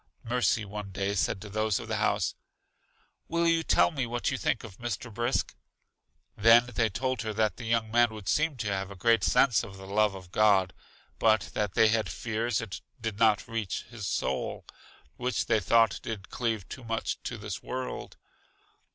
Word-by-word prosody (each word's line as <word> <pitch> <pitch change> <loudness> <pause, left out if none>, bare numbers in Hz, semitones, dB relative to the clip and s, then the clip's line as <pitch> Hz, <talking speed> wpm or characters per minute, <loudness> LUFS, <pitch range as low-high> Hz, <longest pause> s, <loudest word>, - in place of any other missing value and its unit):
Mercy 115 -2 +1
one 105 0 -6
day 95 +1 -2
said 95 -1 0
to 105 - -9
those 110 0 0
of - - -8
the - - -1
house: - - +1 0.9
Will 170 +1 +1
you 165 0 +3
tell 160 - +3
me 135 -6 -2
what 120 +1 -1
you - - -1
think 120 - 0
of 105 -5 -11
Mr. 120 0 -4
Brisk? 120 +4 0 0.8
They 115 +2 +7
then 120 -1 -1
told 130 +5 -2
her 110 -1 -3
that 105 -3 +1
the 115 - -7
young 110 -1 0
man 120 +1 +5
would 105 -3 -9
seem 155 -1 +2
to 110 -4 -4
have 95 0 -3
a 100 - -9
great 115 +2 +3
sense 125 -1 +4
of 95 0 -9
the 95 - -10
love 105 +1 +2
of 95 -2 -11
God, 100 -4 +4 0.5
but 110 -1 +3
that 105 -3 -1
they 110 -1 +6
had 110 0 +1
fears 115 0 -1
it 105 -5 -6 0.2
did 110 -2 -4
not 110 -3 +3
reach 115 -4 -3
his 110 -5 -5
soul, 65 -7 -2 0.5
which 125 -2 -1
they 110 - +3
thought 110 +3 +3
did 105 -4 -6
cleave 115 -5 -2
too 130 - -9
much 115 -1 -3
to 120 - -5
this 105 -3 -6
world. 130 0 -5
110 Hz, 190 wpm, -29 LUFS, 100-120 Hz, 0.9 s, They